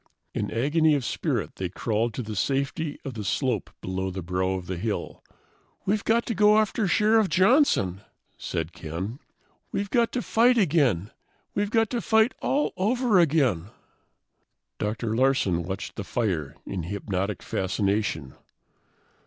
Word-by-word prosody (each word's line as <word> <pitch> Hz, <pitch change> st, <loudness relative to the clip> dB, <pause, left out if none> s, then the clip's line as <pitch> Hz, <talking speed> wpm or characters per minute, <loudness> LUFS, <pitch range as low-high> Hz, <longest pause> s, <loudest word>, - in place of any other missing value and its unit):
In -, -, -2 dB
agony 150 Hz, +6 st, +2 dB
of 135 Hz, -4 st, -2 dB
spirit -, -, -2 dB
they 95 Hz, -2 st, -2 dB
crawled 110 Hz, +4 st, -1 dB
to 125 Hz, -, -3 dB
the 110 Hz, -1 st, -6 dB
safety 140 Hz, -, -1 dB
of 135 Hz, -, -4 dB
the 110 Hz, -2 st, -5 dB
slope 120 Hz, +1 st, -1 dB
below 95 Hz, +1 st, -2 dB
the 95 Hz, -1 st, -5 dB
brow 95 Hz, +2 st, 0 dB
of 95 Hz, -2 st, -4 dB
the 90 Hz, 0 st, -4 dB
hill. 105 Hz, +3 st, -4 dB, 0.6 s
"We've 205 Hz, +1 st, +1 dB
got 230 Hz, +1 st, +2 dB
to 230 Hz, -, -1 dB
go 210 Hz, +1 st, +5 dB
after 215 Hz, 0 st, +1 dB
Sheriff 215 Hz, +2 st, +3 dB
Johnson," 185 Hz, -, +3 dB, 0.3 s
said 80 Hz, +1 st, -4 dB
Ken. 90 Hz, -, -5 dB, 0.5 s
"We've 200 Hz, 0 st, -2 dB
got 235 Hz, -1 st, +3 dB
to 250 Hz, -, -1 dB
fight 240 Hz, +2 st, +4 dB
again; 140 Hz, -, +2 dB, 0.4 s
we've 205 Hz, 0 st, 0 dB
got 225 Hz, -1 st, +2 dB
to 240 Hz, -2 st, -1 dB
fight 220 Hz, +3 st, +3 dB
all 290 Hz, +2 st, +1 dB
over 225 Hz, +1 st, +3 dB
again!" 135 Hz, -, +2 dB, 1.1 s
Dr. 110 Hz, +1 st, -2 dB
Larsen 120 Hz, -9 st, +2 dB
watched 95 Hz, +4 st, -5 dB
the 105 Hz, -, -3 dB
fire 90 Hz, -, -2 dB
in 95 Hz, -, -4 dB
hypnotic 100 Hz, +2 st, -3 dB
fascination. 95 Hz, -6 st, -1 dB
120 Hz, 145 wpm, -26 LUFS, -, 1.1 s, go